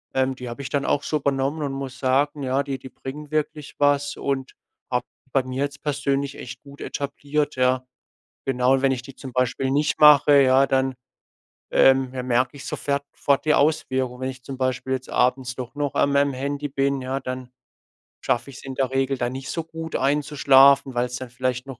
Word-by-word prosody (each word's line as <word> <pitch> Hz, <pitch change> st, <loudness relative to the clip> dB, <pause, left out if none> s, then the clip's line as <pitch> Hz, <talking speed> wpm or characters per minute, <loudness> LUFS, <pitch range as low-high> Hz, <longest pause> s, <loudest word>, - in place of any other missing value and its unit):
ähm, 130 Hz, 0 st, +2 dB
die 125 Hz, -1 st, -7 dB
habe 120 Hz, +4 st, -7 dB
ich 130 Hz, -, -5 dB
dann 140 Hz, 0 st, -1 dB
auch 145 Hz, -, +1 dB
so 155 Hz, -, 0 dB
übernommen 140 Hz, +2 st, -1 dB
und 140 Hz, -, -2 dB
muss 135 Hz, -1 st, -6 dB
sagen, 140 Hz, +3 st, +1 dB
ja, 135 Hz, +2 st, +1 dB
die 135 Hz, -1 st, -4 dB
die 130 Hz, -, -10 dB
bringen 145 Hz, +4 st, -8 dB
wirklich 150 Hz, -1 st, -3 dB
was 145 Hz, 0 st, +2 dB
und 135 Hz, -1 st, -2 dB, 0.4 s
habe 125 Hz, 0 st, 0 dB, 0.3 s
bei 135 Hz, 0 st, +2 dB
mir 130 Hz, +2 st, -3 dB
jetzt 145 Hz, 0 st, -9 dB
persönlich 140 Hz, -1 st, -1 dB
echt 125 Hz, -, -9 dB
gut 140 Hz, 0 st, -14 dB
etabliert, 145 Hz, +1 st, -2 dB
ja. 130 Hz, 0 st, +2 dB, 0.6 s
Genau, 130 Hz, 0 st, +2 dB
wenn 135 Hz, -1 st, +3 dB
ich 125 Hz, -2 st, -3 dB
die 135 Hz, +1 st, -12 dB
zum 130 Hz, -, -9 dB
Beispiel 130 Hz, +1 st, 0 dB
nicht 145 Hz, +2 st, +1 dB
mache, 145 Hz, -1 st, +8 dB
ja, 135 Hz, +1 st, +5 dB
dann, 135 Hz, 0 st, +1 dB, 0.8 s
ähm, 130 Hz, -1 st, +4 dB
merke 125 Hz, +1 st, 0 dB
ich 135 Hz, -, -10 dB
sofert 140 Hz, 0 st, -2 dB
fort 140 Hz, +1 st, +1 dB
die 155 Hz, -, +4 dB
Auswirkung. 130 Hz, -4 st, +1 dB
Wenn 130 Hz, -, -1 dB
ich 130 Hz, -1 st, -9 dB
zum 135 Hz, +1 st, -7 dB
Beispiel 130 Hz, 0 st, -2 dB
jetzt 130 Hz, -1 st, -4 dB
abends 125 Hz, 0 st, +1 dB
doch 125 Hz, 0 st, -7 dB
noch 145 Hz, -1 st, -2 dB
an 140 Hz, 0 st, +3 dB
meinem 140 Hz, 0 st, +2 dB
Handy 140 Hz, +2 st, -3 dB
bin, 140 Hz, 0 st, 0 dB
ja, 130 Hz, +1 st, -3 dB
dann 130 Hz, -1 st, -6 dB, 0.7 s
schaffe 125 Hz, +3 st, -1 dB
ich's 130 Hz, -, -12 dB
in 135 Hz, -1 st, -6 dB
der 130 Hz, -1 st, 0 dB
Regel 135 Hz, 0 st, 0 dB
dann 120 Hz, 0 st, -1 dB
nicht 135 Hz, 0 st, -6 dB
so 165 Hz, -, -2 dB
gut, 160 Hz, 0 st, -7 dB
einzuschlafen, 140 Hz, -1 st, +4 dB
weil's 125 Hz, 0 st, -1 dB
dann 130 Hz, 0 st, -7 dB
vielleicht 125 Hz, 0 st, -2 dB
noch 135 Hz, -3 st, -8 dB
135 Hz, 200 wpm, -23 LUFS, 130-140 Hz, 0.8 s, mache